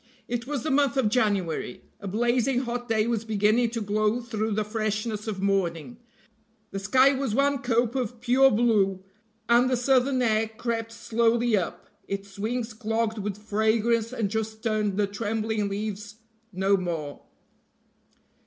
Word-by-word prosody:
It 240 0 -3
was 285 -4 -3
the 310 - -1
month 280 -1 +2
of 245 -6 +3
January; 200 - -1 0.2
a 200 - -7
blazing 240 +5 +1
hot 245 -1 -4
day 220 -1 +2
was 230 -2 -1
beginning 220 +2 +2
to 230 0 -4
glow 210 +2 +1
through 220 -2 -2
the 215 +1 0
freshness 215 0 -3
of 195 -3 -3
morning; 195 +1 -1 0.7
the 195 - -3
sky 260 +7 +4
was 265 -5 -2
one 280 +1 +2
cope 240 -2 +1
of 245 -3 -3
pure 255 +2 +5
blue, 205 -5 +2 0.4
and 240 +2 +4
the 255 - +1
southern 255 +1 +2
air 220 -1 +2
crept 225 0 -4
slowly 230 0 +1
up, 185 -4 -3 0.2
its 195 0 -6
wings 230 +2 -2
clogged 225 0 -1
with 205 -1 -3
fragrance, 220 +2 +1
and 220 -6 -2
just 220 0 -3
tuned 215 -3 0
the 210 - +3
trembling 215 0 -2
leaves 205 +1 -5 0.4
no 195 +1 +2
more. 165 -6 -4
220 Hz, 155 wpm, -26 LUFS, 205-240 Hz, 0.7 s, pure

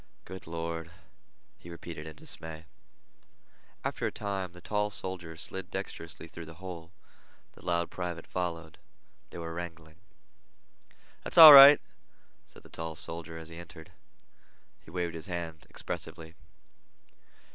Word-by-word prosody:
"Good 95 -1 -10
Lord!" 85 0 -4 0.7
he 85 - -13
repeated 85 -2 -8
in 80 - -9
dismay. 80 +1 -8 1.2
After - - -2
a - - -3
time 95 -3 -4
the 90 - -12
tall 105 +3 -1
soldier 90 -5 -5
slid 95 +3 -6
dexterously 85 0 -6
through 85 0 -10
the 80 - -11
hole. 85 -2 -9 0.6
The - - -18
loud 85 -1 0
private 90 -2 -5
followed. 85 -3 -4 0.5
They - - -10
were 85 -1 -6
wrangling. 80 -2 -8 1.3
"That's - - -4
all 160 -3 +14
right," 140 +1 +11 0.7
said - - -17
the - - -16
tall 80 -1 -6
soldier 80 +1 -4
as 80 0 -10
he 85 - -11
entered. 85 -2 -12 0.9
He - - -18
waved 85 0 -3
his 80 +1 -7
hand 85 -3 -6
expressively. 80 0 -6
85 Hz, 135 wpm, -30 LUFS, 80-90 Hz, 1.3 s, all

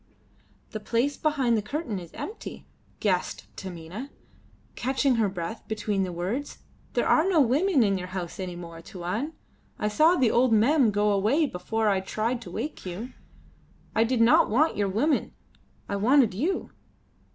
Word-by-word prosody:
"The 215 - -4
place 240 +6 0
behind 270 -6 +1
the 215 - +1
curtain 235 - -3
is 170 -2 -11
empty," 435 - -7 0.3
gasped 185 -4 -1
Taminah, 185 +7 -7 0.7
catching 265 0 +1
her 215 -3 +2
breath 185 +4 -5
between 210 -2 -1
the 185 -1 -1
words. 195 +12 -3 0.4
"There - - +1
are 325 +5 +4
no 350 -4 +4
women 285 +3 +3
in 195 -2 +1
your 180 - -5
house 180 -1 -6
any 180 -2 -4
more, 170 -1 -9
Tuan. 185 - -4 0.4
I 210 - 0
saw 310 +11 +4
the 255 -9 +3
old 245 -1 +3
Mem 245 +3 +4
go 210 0 +2
away 215 +11 +2
before 220 0 -2
I 195 -2 +3
tried 225 +5 -2
to - - -9
wake 300 - -5
you. 200 +8 -6 0.8
I 225 - +5
did 235 0 +1
not 230 +1 +5
want 295 +9 +3
your 200 -1 0
women, 275 +11 +1 0.5
I 200 - -2
wanted 240 +1 +4
you." 315 - -2
220 Hz, 165 wpm, -27 LUFS, 190-270 Hz, 0.8 s, I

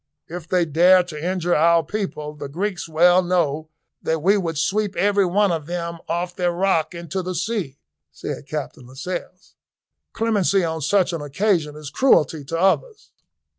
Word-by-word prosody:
"If 170 -1 -8
they 180 -1 +2
dare 175 +4 +5
to 155 -4 -8
injure 175 -1 0
our 165 +1 +4
people, 150 -5 -4
the 145 -2 -8
Greeks 180 +3 -3
well 175 +3 +5
know 160 -4 0 0.3
that 160 -1 -1
we 195 +3 +5
would 165 -6 -2
sweep 205 +5 0
every 200 -1 +2
one 200 +2 +2
of 160 -3 -3
them 170 -1 -4
off 175 +1 -2
their 180 -1 0
rock 175 -3 0
into 170 +2 -4
the 185 0 -4
sea," 175 - -3 0.3
said 145 - -7
Captain 145 -5 -6
Lascelles. 180 +7 -7 0.6
"Clemency 205 -4 +1
on 160 -1 -2
such 185 +3 +2
an 165 - -3
occasion 150 0 0
is 150 -2 -8
cruelty 160 - +3
to 165 +4 -3
others." 300 - 0
175 Hz, 165 wpm, -22 LUFS, 155-190 Hz, 0.6 s, dare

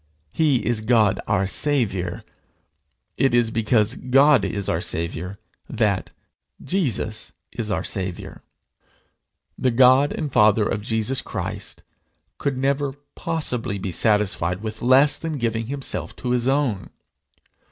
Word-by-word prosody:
He 145 - +1
is 120 -2 0
God 110 -3 +3
our 100 -2 +1
Saviour: 100 - -1 0.9
it 135 -3 +2
is 120 -2 +2
because 110 0 +2
God 135 -1 +4
is 100 0 -2
our 80 - 0
Saviour 85 +3 -3 0.3
that - - 0 0.5
Jesus 130 - -2 0.2
is 110 -3 -5
our 95 -2 -1
Saviour. 95 -3 -5 1.2
The 130 - +2
God 130 +3 +5
and 150 -5 -4
Father 105 0 +4
of 105 - -2
Jesus 110 +4 -1
Christ - - -6 0.6
could 140 -2 -1
never 140 +1 0 0.2
possibly 125 -11 -2
be 95 -1 -4
satisfied 100 -2 +1
with 110 -1 -5
less 135 +4 +4
than 160 -2 -4
giving 115 -2 -2
himself 135 0 -4
to 125 - -4
his 125 0 +1
own! 135 -7 0
115 Hz, 125 wpm, -23 LUFS, 105-135 Hz, 1.2 s, God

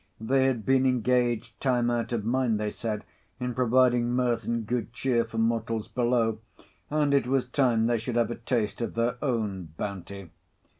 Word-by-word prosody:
They 130 +4 +2
had 120 -5 -1
been 130 0 +3
engaged 120 -2 +1
time 120 -3 +2
out 120 0 -1
of 115 -3 -2
mind, 120 -2 +1
they 105 -1 -1
said, 110 -3 -4 0.3
in 125 -1 -2
providing 125 0 +3
mirth 125 -1 0
and 115 -1 -1
good 120 0 -2
cheer 125 -2 +1
for 115 0 -8
mortals 115 -1 0
below; 120 -3 +1 0.5
and 150 -1 +1
it 140 -3 +3
was 130 -1 +1
time 125 -4 +2
they 120 0 +1
should 120 +2 -4
have 120 0 +2
a - - -3
taste 115 -3 -2
of 115 - -3
their 120 +1 0
own 100 - -2
bounty. 100 -2 -6
120 Hz, 180 wpm, -27 LUFS, 110-125 Hz, 0.5 s, been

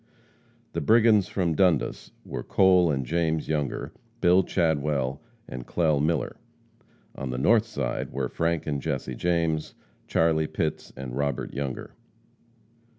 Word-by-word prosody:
The - - -2
brigands 110 -3 +5
from 95 -6 0
Dundas 90 -4 +1 0.2
were - - -5
Cole 90 -2 +4
and 65 -3 -1
James 80 +1 0
Younger, 75 -3 -2 0.3
Bill 90 -1 +5
Chadwell 75 -6 0 0.3
and 60 -2 -7
Clell 80 -4 +2
Miller. 80 -2 0 0.8
On 65 - -5
the 65 - -3
north 110 - +4
side 115 - -3
were 65 -2 -2
Frank 85 +4 -1
and 70 -2 -2
Jesse 70 -4 -3
James, 80 +1 -1 0.3
Charlie 80 -1 +2
Pitts 80 0 -3
and 65 -2 -6
Robert 70 -2 -2
Younger. 70 -1 -4
80 Hz, 130 wpm, -26 LUFS, 70-90 Hz, 0.8 s, brigands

